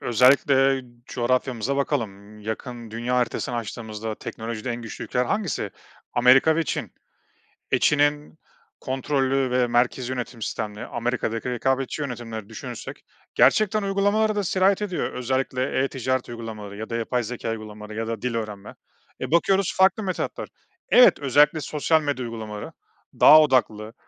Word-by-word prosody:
Özellikle 135 +2 +4 0.2
coğrafyamıza 130 +1 -1
bakalım. 105 -7 -3
Yakın, 115 +1 -6
dünya 120 +3 -2
haritasını 120 0 -1
açtığımızda 110 -1 -5
teknolojide 115 +3 -6
en 120 0 -4
güçlü 115 - -7
ülkeler 125 0 0
hangisi? 200 - -2 0.4
Amerika 130 +6 +5
ve 165 - +2
Çin. - - -4 0.8
E, - - +3
Çin'in 145 +1 +1 0.4
kontrollü 135 0 0
ve 125 -1 +2
merkezî 120 +1 +1
yönetim 125 -2 -5
sistemli, 105 -1 -4
Amerika'daki 120 0 -2
rekabetçi 130 +4 -1
yönetimleri 115 -5 -6
düşünürsek 110 - -8 0.3
gerçekten 205 - +4
uygulamalara 205 +2 +1
da 205 - 0
sirayet 190 +2 +2
ediyor. 190 -4 -2
Özellikle 130 +1 -1
e-ticaret 130 -1 -2
uygulamaları 110 -4 -7
ya 110 - -6
da 115 - -3
yapay 120 +1 -1
zekâ 115 0 -4
uygulamaları 105 -1 -8
ya 115 0 -2
da 115 -2 -4
dil 125 -2 -2
öğrenme. 105 -3 -5 0.5
E, - - -4
bakıyoruz 190 +2 +2
farklı 190 +3 +4
metotlar. 185 -2 -3 0.4
Evet, 250 - +7
özellikle 145 +3 +3
sosyal 155 +2 +1
medya 145 -4 -2
uygulamaları 110 -3 -6 0.5
daha 155 +1 +9
odaklı, 115 -6 +1
125 Hz, 135 wpm, -24 LUFS, 115-145 Hz, 0.8 s, daha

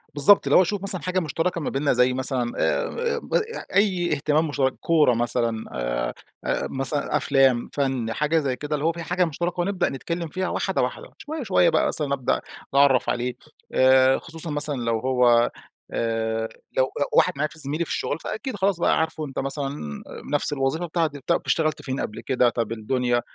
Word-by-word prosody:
بالضبط 155 +8 +6
اللي - - +5
هو - - +8
أشوف 195 +2 -1
مثلًا 195 -3 +1
حاجة 185 +1 0
مشتركة 165 +1 -2
ما - - -2
بيننا 140 +1 +1
زي 125 +1 +3
مثلًا 125 -2 -1
آآ 475 0 0
ب - - -9 0.4
أي 185 -4 +2
اهتمام 150 +2 +1
مشترك، 135 -3 0
كورة 155 -6 +3
مثلًا 115 -1 -1
آآ، - - -2 0.3
آآ - - -1
مثلًا 135 +2 0
أفلام، 135 -4 +3
فن 130 -5 -1
حاجة 150 +4 +1
زي 135 -4 -1
كده 150 +3 -3
اللي 150 +1 -3
هو 165 - +3
في 170 0 -7
حاجة 180 +2 +1
مشتركة، 175 +3 -3
ونبدأ 190 0 0
نتكلم 170 +5 -4
فيها 185 +5 -3
واحدة - - -1
واحدة. - - -4
شوية، 305 -2 -6
شوية 185 -4 +3
بقى - - +2
مثلًا 145 -3 0
أبدأ 130 -3 0 0.3
أتعرف 140 -2 +4
عليه 125 +1 -1 0.4
آآ 130 0 +5
خصوصًا 165 0 -7
مثلًا 145 0 +1
لو 115 -3 -1
هو 125 -2 +3 0.4
آآ 115 -1 -1 0.3
لو 130 - +5 0.2
لو 145 - 0
واحد - - +4
معايا 150 +2 -1
ف 155 - -14
زميلي 155 +3 -1
في - - -7
الشغل 145 - -2
فأكيد 260 +6 -5
خلاص 190 -2 0
بقى - - +2
عارفه 160 -1 -2
أنتَ 135 - -5
مثلًا 135 - -4 0.3
نفس 145 - +1
الوظيفة 145 +5 -1
بتاعتي، 160 -3 -1
طب 170 - +2
اشتغلت 155 -2 0
فين 135 -1 -4
قبل 105 - -4
كده؟ 125 -2 +2
طب 115 -1 -3
الدنيا، 120 +2 0
145 Hz, 190 wpm, -24 LUFS, 125-165 Hz, 0.4 s, هو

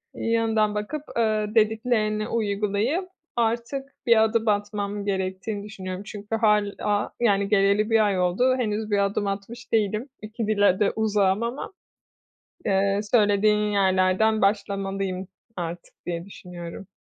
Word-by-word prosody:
iyi 230 - -2
yanından 220 -2 +2
bakıp, 245 +9 -3
ııı, 215 -1 0
dediklerini 215 -1 +1
uygulayıp 215 - -1 0.3
artık 235 +4 -1 0.2
bir 230 -2 +6
adım 225 0 +1
atmam 205 0 -1
gerektiğini 190 +1 -2
düşünüyorum. 190 -2 -6
Çünkü 210 +1 -5
hâlâ, 210 -1 +1
yani, 200 -4 +2
geleli 200 +1 +3
1 225 -1 +4
ay 195 -3 +1
oldu. 220 +9 +2
Henüz 215 -2 -2
bir 200 -1 +3
adım 200 +1 -1
atmış 200 +5 -6
değilim. 215 +4 +1
2 215 +1 -4
dile 205 -3 +3
de 205 - +3
uzağım 210 -1 +2
ama, 245 +10 -4 0.9
eee, 195 0 +2
söylediğin 210 -1 +3
yerlerden 190 +2 +2
başlamalıyım 195 -2 -1 0.3
artık 170 0 -5
diye 170 -1 -4
düşünüyorum. 180 -1 -9
210 Hz, 125 wpm, -25 LUFS, 195-220 Hz, 0.9 s, bir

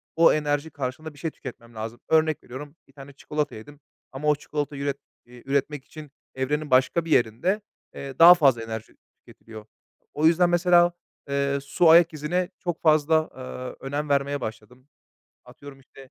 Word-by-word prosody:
o 165 0 +6
enerji 150 0 -1
karşılığında 145 +2 -6
bir 145 - -17
şey 160 +1 -3
tüketmem 115 -3 -11
lazım. 115 +2 -6
Örnek 155 -1 +2
veriyorum, 145 +4 -9
1 135 - -25
tane 140 0 -12
çikolata 150 +1 -4
yedim 145 +7 -12 0.3
ama 135 +3 -5
o 150 - +4
çikolatayı 145 -1 -5
üret 140 -1 -2 0.3
eee, 120 0 -16
üretmek 140 0 -2
için 155 -3 -12 0.2
evrenin 145 +2 -2
başka 130 +6 +3
bir 165 - -6
yerinde, 125 - +1 0.3
eee, 135 -1 -8
daha 170 +2 +11
fazla 135 -9 +3
enerji 110 -1 -7 0.2
tüketiliyor. 110 -1 -14 0.5
O 150 - 0
yüzden 175 +1 +4
mesela, 175 0 +4 0.4
eee, 140 0 0
su 165 +4 +2
ayak 165 0 +6
izine 175 +5 -2
çok 175 -2 -4
fazla, 155 0 +3
eee, 130 +1 -8
önem 145 +1 -3
vermeye 140 0 0
başladım. 120 +4 -8 0.6
Atıyorum 140 -1 -13
işte, 135 0 -17
145 Hz, 165 wpm, -25 LUFS, 130-155 Hz, 0.6 s, daha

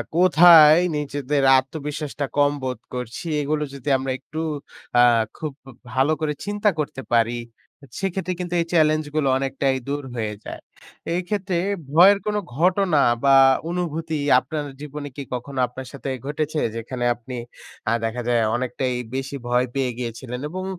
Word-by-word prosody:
কোথায় 170 -3 +8 0.2
নিজেদের 145 -1 -1
আত্মবিশ্বাসটা 145 +1 -3
কম 145 0 +4
বোধ 130 -3 -3
করছি 125 +5 -5 0.2
এগুলো 150 +1 -1
যদি 140 +1 -5
আমরা 130 0 -3
একটু 155 - -8 0.6
আ - - +8 0.4
খুব 155 -2 -4 0.2
উ - - -9 0.2
ভালো 135 +4 +2
করে 150 -1 0
চিন্তা 205 +1 +1
করতে 145 -3 -3
পারি, 115 +1 +2 0.6
সেক্ষেত্রে 190 -1 -2
কিন্তু 180 -1 -4
এই - - -1
চ্যালেঞ্জ 155 -1 +3
গুলো 155 -3 +1
অনেকটাই 135 0 0
দূর 145 +1 -2
হয়ে 110 -3 -2
যায়। - - -7 0.6
এক্ষেত্রে 185 0 -2 0.3
ভয়ের 185 +6 +7
কোন 210 0 -1 0.2
ঘটনা 180 -2 +3 0.2
বা 135 0 +6 0.3
অনুভূতি 165 -2 -2 0.2
আপনার 150 +2 -5 0.2
জীবনে 150 0 -6
কি 140 - -5
কখনো 130 +2 -5
আপনার 130 +1 -9
সাথে 140 0 -6 0.2
ঘটেছে? 150 +2 -2 0.2
যেখানে 120 +2 -4
আপনি 125 +2 -9 0.6
আ - - +3
দেখা 120 +2 -3
যায় 120 -1 +3
অনেকটাই 125 +1 -2 0.2
বেশি 135 +1 -4
ভয় 125 +1 +2
পেয়ে 130 -2 0
গিয়েছিলেন? 125 +1 -5
এবং 185 +2 -5
145 Hz, 145 wpm, -23 LUFS, 130-160 Hz, 0.6 s, কোথায়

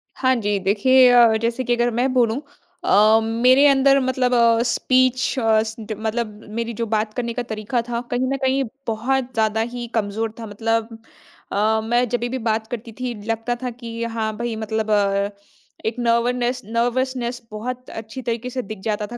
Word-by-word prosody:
हाँ 260 -1 +2
जी, 205 -3 0
देखिए, 245 +7 +5
अ, 235 -2 +6
जैसे 235 +2 -1
कि 245 0 +1
अगर 240 0 +1
मैं 245 +3 0
बोलूँ 245 0 +2 0.4
अ, 215 +2 +5
मेरे 250 +5 +4
अंदर 275 0 +5
मतलब 255 -1 0
अ, 235 -1 +4
स्पीच, 255 +1 +2
अ, 220 -2 +3
स 220 0 -6 0.2
मतलब 220 +2 -2 0.3
मेरी 235 0 -2
जो 230 +1 -2
बात 215 0 -1
करने 235 -1 -3
का 245 - -3
तरीका 220 +1 -2
था, 235 0 -2
कहीं 250 +1 0
न - - -1
कहीं 265 +1 +2 0.2
बहुत 250 +3 -1
ज़्यादा 220 -1 +1
ही 240 -1 -5
कमज़ोर 220 +1 -1
था। 230 - -6
मतलब 225 +2 -2 0.5
अ, 220 +2 +2
मैं 240 +2 +1
जभी 240 +1 -1
भी 260 - -2
बात 220 0 -1
करती 230 -1 -6
थी, 250 -1 -2
लगता 225 +2 -1
था 250 - -1
कि 230 -1 -7
हाँ 225 -2 -2
भई, 235 0 -3
मतलब 220 0 -2
अ, 200 -1 +2 0.6
एक 220 +1 -1
नर्वननेस 240 +1 +1
नर्वसनेस 245 +2 -1
बहुत 250 +4 -6
अच्छी 225 +3 -7
तरीके 235 +1 -3
से 255 0 -3
दिख 215 -2 -8
जाता 210 -1 -2
था 240 - -8
235 Hz, 180 wpm, -21 LUFS, 220-250 Hz, 0.6 s, अ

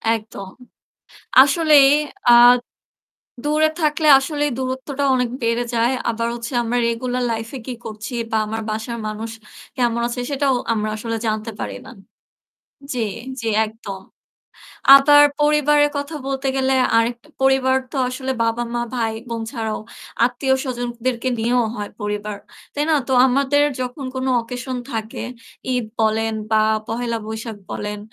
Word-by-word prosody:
একদম। 205 -3 -8 0.9
আসলেই 290 -1 +5 0.4
আ - - +9 1.1
দূরে 305 +1 +2
থাকলে 305 0 +1
আসলেই 295 +1 -1
দূরত্বটা 260 +2 -3
অনেক 250 -2 0
বেড়ে 230 +1 +1
যায়। 235 +3 +2 0.2
আবার 230 0 -1
হচ্ছে 235 +2 -6
আমরা 240 +2 -1
regular 250 +2 -2
life 225 0 -4
এ - - -8
কি 250 - -3
করছি 215 +3 -7 0.2
বা 220 - +2
আমার 220 +1 -4
বাসার 225 +2 -4
মানুষ 220 +1 -5 0.5
কেমন 235 -1 +1
আছে 245 +1 -4
সেটাও 275 -2 +1 0.2
আমরা 215 -1 -1
আসলে 230 +1 -3
জানতে 215 +1 -2
পারি 100 -1 -4
না - - -10 1.0
জি, - - -5 0.4
জি 230 - -4 0.2
একদম। 210 -3 -8 0.9
আবার 290 +1 +7 0.2
পরিবারের 295 0 +4
কথা 285 +2 -4
বলতে 270 0 -2
গেলে 265 0 +1 0.2
আরেকটা 235 +4 -1
পরিবার 265 0 +3
তো 275 - -4
আসলে 260 +1 -3
বাবা, 230 +1 0
মা, 240 - -1
ভাই, 225 -2 -1 0.2
বোন 230 -1 -3
ছাড়াও 225 -4 -3 0.5
আত্মীয়স্বজনদেরকে 250 -1 -1
নিয়েও 240 +1 +2
হয় 205 -1 -5
পরিবার। 210 0 -3 0.4
তাই 290 - -1
না? 310 - +4
তো - - -3 0.2
আমাদের 280 +2 +2 0.2
যখন 255 +2 -5
কোন 260 0 -2 0.2
occasion 250 +2 -5
থাকে, 220 -1 -4 0.5
ঈদ 245 -3 -1 0.2
বলেন 220 0 +1 0.2
বা 215 0 +4 0.3
পহেলা 235 0 -2
বৈশাখ 220 0 -6
বলেন 210 0 -4
245 Hz, 140 wpm, -20 LUFS, 225-270 Hz, 1.1 s, আ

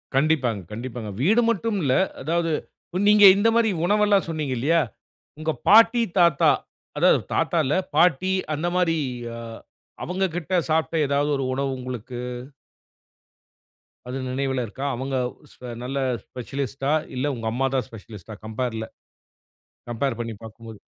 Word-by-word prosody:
கண்டிப்பாங்க 135 -8 +2
கண்டிப்பாங்க. 115 -1 -6
வீடு 220 - +4
மட்டும் 225 0 0
இல்ல 130 -2 +2 0.3
அதாவது, 165 +3 0 0.6
நீங்க 210 -1 +7
இந்த 225 +3 +3
மாரி 230 -2 +3 0.2
உணவுல்லாம் 205 -1 +3
சொன்னீங்க 155 -5 -2
இல்லையா, 160 +7 +3 0.6
உங்க 155 0 -1 0.2
பாட்டி, 230 +3 +7 0.2
தாத்தா 170 -5 +5 0.5
அதாவது - - +5
தாத்தா 170 - +1
இல்ல 140 - +1 0.2
பாட்டி 180 +2 +3 0.2
அந்த 155 +3 -2
மாரி 170 -3 +2 0.4
அ - - -7 0.7
அவங்கக்கிட்ட 180 -1 -2 0.2
சாப்பட்ட 160 +1 +1
ஏதாவது 145 +1 +1
ஒரு 135 - -2
உணவு 135 +1 -1
உங்களுக்கு 125 -1 -6 1.9
அது 125 - -4
நினைவுல 130 -1 -1
இருக்கா? 130 +6 -6
அவங்க 135 +2 -3 0.4
ஸ்பெ 125 - -11 0.2
நல்ல 135 +2 -4 0.3
ஸ்பெஷலிஸ்ட்டா 135 +2 -4 0.2
இல்ல 140 +3 0
உங்க 115 -1 -5
அம்மா 130 +3 0
தான் 130 - 0
ஸ்பெஷலிஸ்ட்டா 110 -2 -11
கம்பேர்ல. 110 0 -3 1.0
கம்பேர் 120 +1 -1
பண்ணி 115 -1 -4
பார்க்கும்போது. 115 0 -10
135 Hz, 125 wpm, -24 LUFS, 125-170 Hz, 1.9 s, நீங்க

